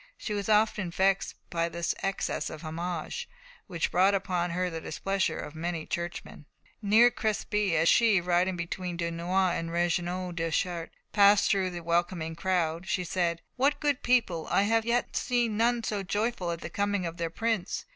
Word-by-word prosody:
She 215 - -4
was 205 0 -3
often 210 -3 +2
vexed 190 +3 +1 0.2
by 170 0 0
this 170 +1 -2
excess 195 0 -2
of 155 +1 -9
homage, 175 - -4 0.4
which 170 -2 -2
brought 190 +3 +4
upon 180 -2 -1
her 180 +2 -1
the 165 -2 -5
displeasure 195 +1 -1
of 150 - -6
many 165 0 -3
churchmen. 170 -3 -5 0.3
Near 220 +4 +6
Crespy, 210 -4 0
as 165 +1 +3
she, 220 -2 +5
riding 180 +1 +1
between 175 +1 -4
Dunois 175 +2 0
and 165 -1 -3
Regnault 175 +1 -1
de 165 0 -1
Chartres, 170 0 -1 0.2
passed 200 0 +5
through 190 -2 +1
the 175 -1 -7
welcoming 170 -1 0
crowd, 170 0 -1
she 185 - 0
said: 170 -1 -1
"What 275 +3 +2
good 290 -3 0
people! 225 -10 +1
I 195 - +3
have 225 +2 +2
yet 240 +1 0
seen 240 -4 +1
none 235 +2 +2
so 210 -2 -2
joyful 205 -1 -1
at 170 -1 -3
the 160 - -6
coming 205 -1 0
of 165 0 -5
their 165 -1 -2
prince. 220 +1 -2
180 Hz, 175 wpm, -28 LUFS, 170-205 Hz, 0.4 s, Near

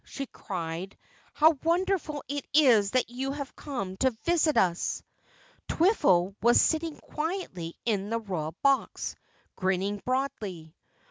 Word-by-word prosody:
she 275 - -6
cried, 180 -4 -6 0.3
"How 310 -1 +4
wonderful 335 -3 0
it 285 0 -3
is 235 -10 +6
that 250 +1 0
you 265 +2 -3
have 280 -1 -6
come 195 -10 -5
to 260 - +3 0.2
visit 335 -3 +3
us!" 175 -2 +1 0.6
Twiffle 195 - +3
was 240 +2 +5
sitting 320 -1 +1
quietly 300 - -4
in 205 -3 0
the 230 +1 0
Royal 175 -7 -4
Box, 275 -1 +1 0.4
grinning 190 +2 -1
broadly. 210 - -3
245 Hz, 125 wpm, -28 LUFS, 190-300 Hz, 0.6 s, is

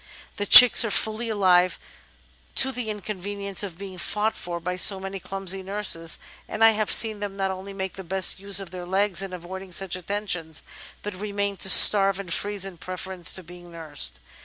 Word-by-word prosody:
The 205 - -4
chicks 250 +2 +9
are 225 - -3
fully 220 +3 -2
alive 185 -4 +1 0.8
to 265 - +3
the 245 -4 -6
inconvenience 200 -1 -4
of 190 -5 -6
being 190 -1 -10
fought 210 +4 -2
for 175 -1 -7
by 180 +2 -5
so 190 +2 +4
many 195 0 -8
clumsy 195 0 -4
nurses, 190 -4 -2 0.3
and 215 - -2
I 225 - +7
have 215 -1 -2
seen 220 -2 +5
them 205 -1 -7
not 195 -1 -3
only 190 +1 -9
make 190 -1 -6
the 190 - -10
best 190 +1 +1
use 200 0 +1
of 195 -3 -9
their 180 -1 -9
legs 195 0 -1
in 195 -1 -7
avoiding 185 +1 -10
such 185 0 -2
attentions, 180 -4 -5 0.4
but 210 - -6
remain 200 +1 -5
to 190 - +1
starve 195 0 +6
and 180 -4 -4
freeze 205 -1 -3
in 185 -4 -10
preference 185 0 -3
to 185 - -4
being 175 +1 -15
nursed. 145 - -2
195 Hz, 190 wpm, -23 LUFS, 180-205 Hz, 0.8 s, chicks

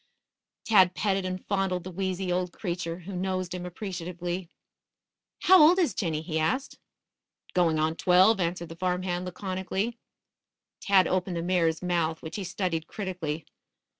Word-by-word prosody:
Tad 190 -5 +5
petted 195 -2 0
and 185 0 -4
fondled 190 -3 0
the 185 - -7
wheezy 190 0 -2
old 180 0 0
creature, 170 -3 -3
who 190 +2 -7
nosed 185 -1 -2
him 180 -1 -5
appreciatively. 180 -2 -5 0.9
"How 375 -2 +8
old 325 +5 +7
is 335 - +2
Jinny?" 160 -5 -2
he 160 -2 -2
asked. 255 - -1 0.7
"Going 170 -3 +3
on 155 +1 +1
twelve," 185 +5 +5
answered 170 -1 -2
the 165 - -8
farm 180 +1 -1
hand 180 -1 -2
laconically. 190 +4 -3 0.8
Tad 195 -3 +4
opened 185 -1 -1
the 165 - -2
mare's 170 -2 +1
mouth, 170 -3 0
which 160 +3 -6
he 200 - -3
studied 175 -3 -2
critically. 175 -6 -4
180 Hz, 150 wpm, -28 LUFS, 170-190 Hz, 0.9 s, How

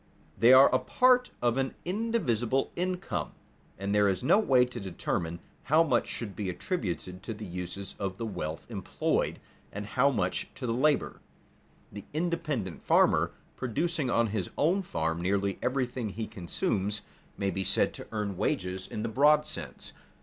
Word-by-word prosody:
They 115 +5 +6
are 130 +1 +8
a - - +5
part 250 0 +4
of 120 +1 +2
an 135 0 -1
indivisible 170 - 0
income, 185 +1 -2 0.4
and 100 +1 -2
there 105 0 +4
is 95 +4 0
no 195 - +5
way 130 -12 +4
to 125 - -7
determine 85 -3 -3 0.3
how 155 +4 +5
much 130 -7 +1
should 105 -5 -5
be 100 -3 -3
attributed 90 - -3
to 110 +2 -5
the 105 0 -7
uses 90 +1 -6
of 95 -2 -3
the 115 - -3
wealth 85 -7 -4
employed 100 -4 -1 0.3
and 105 +1 -5
how 125 +6 +3
much 95 -9 -1
to 130 - -5
the 115 - 0
labor. 145 +4 +1 0.7
The 100 -1 -8
independent 155 - -2
farmer, - - +4 0.2
producing 145 +3 -1
on 115 -1 +3
his 95 -5 -1
own 175 +7 +3
farm 80 - -2
nearly 100 +2 0
everything 125 -3 -1
he 110 +3 -4
consumes, 100 +1 -2 0.3
may 100 -1 0
be 95 +1 -2
said - - +2
to - - -9
earn 105 -4 -2
wages 95 +1 -1
in 105 - -4
the - - -1
broad 150 +6 +4
sense. - - -6
115 Hz, 165 wpm, -29 LUFS, 95-140 Hz, 0.7 s, are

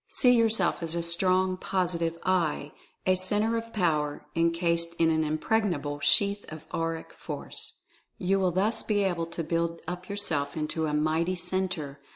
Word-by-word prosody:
See 250 - +4
yourself 225 -7 +3
as 165 0 0
a 170 - -1
strong 185 +2 +2
Positive 170 -3 -1
"I" 165 -5 0 0.3
a 185 - +4
Centre 210 +5 0
of 230 0 -4
Power 155 -8 0
— - - -37
encased 170 0 +1
in 165 -1 +3
an 160 0 +2
Impregnable 155 -2 0
Sheath 200 +7 +3
of 155 0 -9
Auric 165 0 -3
Force. - - -7 0.4
You 195 +1 +1
will 185 -1 +2
thus 200 +6 +1
be 205 -2 +1
able 175 -3 0
to 170 0 -4
build 165 +1 -1
up 180 +2 -6
yourself 165 -8 -1
into 155 +1 -1
a 150 - -2
mighty 160 +4 +1
Centre. 180 -5 -1
170 Hz, 165 wpm, -28 LUFS, 160-190 Hz, 0.4 s, See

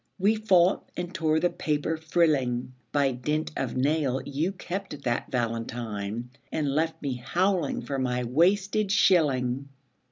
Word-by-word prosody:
We 200 +3 +3
fought 190 -4 +3
and 175 0 -4
tore 160 -3 +2
the 175 +2 +1
paper 150 +1 -1
frilling. 150 -7 +1 0.2
By 140 -2 +2
dint 150 +5 -2
of 130 -2 -2
nail 140 -1 +1
you 150 +6 -1
kept 185 -5 -6
that 120 -1 -1
valentine, 115 -1 -3 0.2
And 145 -3 0
left 160 +2 0
me 135 -3 -2
howling 175 +4 0
for 135 -1 -3
my 125 -1 0
wasted 190 - +2
shilling. 140 - +3
150 Hz, 135 wpm, -27 LUFS, 125-175 Hz, 0.2 s, We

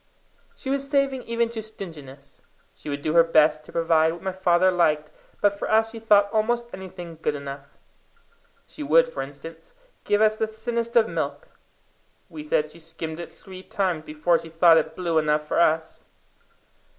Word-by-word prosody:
She 265 - -5
was 275 0 -2
saving 275 -2 +1
even 235 0 0
to 230 -1 -5
stinginess. 165 -11 -10 0.3
She - - -10
would 140 0 -4
do 155 - 0
her 165 0 +7
best 155 -2 +3
to - - -13
provide 165 -1 +2
what 170 - -11
my 190 - -1
father 185 0 +3
liked, 155 -4 +1 0.3
but 205 -1 +4
for - - -3
us 220 +1 +3
she 225 - -8
thought 205 -2 +4
almost 235 +2 +1
anything 180 -3 -9
good 150 - 0
enough. 140 0 -9 0.9
She - - -12
would, - - +4
for - - -5
instance, 160 - -10 0.3
give 205 - +1
us 215 0 +4
the 220 0 -1
thinnest 230 +1 -4
of 225 -2 +5
milk - - -4 0.8
we 305 - -8
said 155 - 0
she 170 - -14
skimmed 160 0 -7
it 170 - -7
three 185 -1 -12
times 185 -5 -2
before 160 +2 +1
she 165 0 -10
thought 165 0 +5
it 160 0 -4
blue 170 -3 +1
enough 150 0 0
for - - 0
us. 160 -1 +1
175 Hz, 180 wpm, -24 LUFS, 160-220 Hz, 0.9 s, her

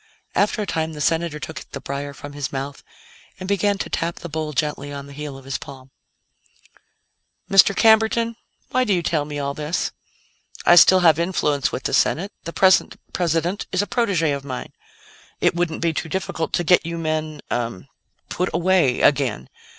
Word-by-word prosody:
After 210 +1 +1
a - - -4
time, 160 -3 -2
the 150 - -8
Senator 165 +1 0
took 160 - -6
the - - -4
briar 140 +1 -5
from 145 +1 -10
his 145 -2 -4
mouth 140 +1 -5 0.6
and 185 - -6
began 200 +1 +1
to - - -4
tap 170 +1 -2
the 170 - -8
bowl 155 0 -3
gently 145 -1 -2
on 140 -1 -6
the 140 - -12
heel 145 -1 -7
of 135 - -14
his 135 -1 -3
palm. 135 -1 -12 1.6
"Mr. 195 0 +6
Camberton, 225 +2 +4 0.4
why 255 0 +2
do 210 -6 +2
you 175 - -1
tell 155 -4 0
me 145 0 -6
all 140 -1 -2
this? 150 +3 -2 0.7
I - - +7
still 185 +2 +7
have 165 -3 +5
influence 150 -5 0
with 130 - -4
the - - -2
Senate; 195 +6 +2
the 170 - -4
present 190 -1 +3
President 175 +2 -1
is 185 +2 +1
a - - -3
protégé 185 - +1
of 140 - -7
mine. 130 -3 -6 0.7
It - - +3
wouldn't 170 -2 -1
be 165 -1 +1
too 160 - -4
difficult 165 -2 -3
to 175 - +1
get 180 +2 +4
you 170 0 -4
men 155 -2 -3
ah 115 -6 -2 0.5
put 180 +1 -1
away 170 -7 +2
again. 135 -6 +2
160 Hz, 185 wpm, -22 LUFS, 145-185 Hz, 1.6 s, I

